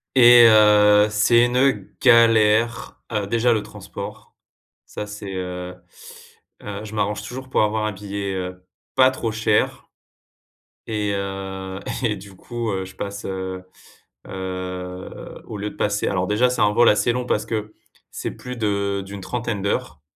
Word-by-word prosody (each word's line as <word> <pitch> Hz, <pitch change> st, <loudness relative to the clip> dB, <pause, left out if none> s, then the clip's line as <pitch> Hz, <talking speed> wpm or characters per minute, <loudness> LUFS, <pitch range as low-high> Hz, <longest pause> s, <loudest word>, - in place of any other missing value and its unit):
Et 120 Hz, -1 st, +9 dB
heu, 105 Hz, -1 st, +6 dB
c'est 115 Hz, +3 st, +4 dB
une 125 Hz, +2 st, +1 dB
galère, 115 Hz, -2 st, +4 dB
heu, 105 Hz, -3 st, -1 dB
déjà 115 Hz, +2 st, +2 dB
le 110 Hz, -, 0 dB
transport. 100 Hz, -, -9 dB, 0.5 s
Ça, 105 Hz, -, -7 dB
c'est, 105 Hz, -1 st, -8 dB
heu 90 Hz, -1 st, -5 dB, 0.9 s
heu, 105 Hz, 0 st, -6 dB
je 110 Hz, 0 st, -9 dB
m'arrange 105 Hz, 0 st, -1 dB
toujours 130 Hz, +1 st, -8 dB
pour -, -, +3 dB
avoir 110 Hz, 0 st, 0 dB
un 105 Hz, -, -2 dB
billet, 100 Hz, 0 st, -5 dB
heu, 90 Hz, 0 st, -6 dB, 0.3 s
pas 130 Hz, 0 st, +6 dB
trop 115 Hz, -4 st, -3 dB
cher. 110 Hz, -1 st, 0 dB, 1.0 s
et 105 Hz, -2 st, -1 dB
heu, 95 Hz, -1 st, -5 dB, 0.2 s
et 110 Hz, -4 st, +1 dB
du 100 Hz, 0 st, -12 dB
coup, 120 Hz, +1 st, -4 dB
heu, 95 Hz, -1 st, -2 dB
je 95 Hz, -, -13 dB
passe, 100 Hz, 0 st, -6 dB
heu 95 Hz, -1 st, -5 dB, 0.6 s
heu, 90 Hz, -1 st, -6 dB
au 105 Hz, -, -6 dB
lieu 105 Hz, +1 st, -4 dB
de -, -, -15 dB
passer 105 Hz, 0 st, -1 dB
alors 90 Hz, -1 st, 0 dB
déjà, 110 Hz, +5 st, +2 dB
c'est 125 Hz, -, -1 dB
un 105 Hz, -1 st, +4 dB
vol 120 Hz, +2 st, +5 dB
assez 105 Hz, +3 st, +3 dB
long 125 Hz, +1 st, -2 dB
parce 105 Hz, -3 st, 0 dB
que, 110 Hz, -1 st, -4 dB, 0.4 s
c'est -, -, -4 dB
plus 125 Hz, 0 st, -8 dB
de 100 Hz, -2 st, -1 dB
d'une 100 Hz, 0 st, -8 dB
trentaine 115 Hz, +1 st, -3 dB
d'heures, 75 Hz, -6 st, -2 dB
105 Hz, 160 wpm, -22 LUFS, 95-115 Hz, 1.0 s, Et